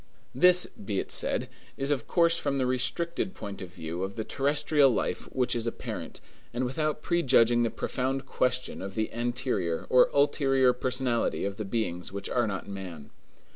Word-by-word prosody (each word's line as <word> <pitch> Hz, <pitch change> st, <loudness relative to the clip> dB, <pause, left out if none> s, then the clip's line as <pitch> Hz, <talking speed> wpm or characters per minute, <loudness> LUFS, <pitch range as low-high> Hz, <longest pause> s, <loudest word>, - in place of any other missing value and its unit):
This, 180 Hz, 0 st, +5 dB
be 100 Hz, -1 st, -4 dB
it -, -, -4 dB
said, -, -, +2 dB, 0.3 s
is 135 Hz, +1 st, -1 dB
of 130 Hz, -6 st, -1 dB
course 170 Hz, -1 st, +4 dB
from 140 Hz, -4 st, -1 dB
the 130 Hz, -, +1 dB
restricted 165 Hz, +9 st, -1 dB
point 100 Hz, -1 st, -7 dB
of 90 Hz, -2 st, -7 dB
view 85 Hz, -1 st, -5 dB
of 95 Hz, +1 st, -3 dB
the 110 Hz, -, -3 dB
terrestrial 145 Hz, +2 st, +3 dB
life 125 Hz, -, -2 dB
which 125 Hz, -2 st, 0 dB
is 115 Hz, -1 st, -2 dB
apparent, 115 Hz, -, -5 dB, 0.3 s
and 125 Hz, +1 st, 0 dB
without 150 Hz, +4 st, -2 dB
prejudging 125 Hz, -8 st, +4 dB
the 115 Hz, -, +2 dB
profound 130 Hz, +3 st, -2 dB
question 130 Hz, -1 st, -1 dB
of 95 Hz, 0 st, -6 dB
the 110 Hz, 0 st, -2 dB
anterior 120 Hz, -8 st, -1 dB
or 125 Hz, -, +6 dB
ulterior 135 Hz, -3 st, +3 dB
personality 125 Hz, -3 st, -1 dB
of 100 Hz, 0 st, -4 dB
the 110 Hz, -, -4 dB
beings 95 Hz, -5 st, -2 dB
which 100 Hz, 0 st, -5 dB
are 120 Hz, -2 st, +2 dB
not 100 Hz, -2 st, -4 dB
man. 90 Hz, -7 st, -8 dB
125 Hz, 175 wpm, -28 LUFS, 100-135 Hz, 0.3 s, or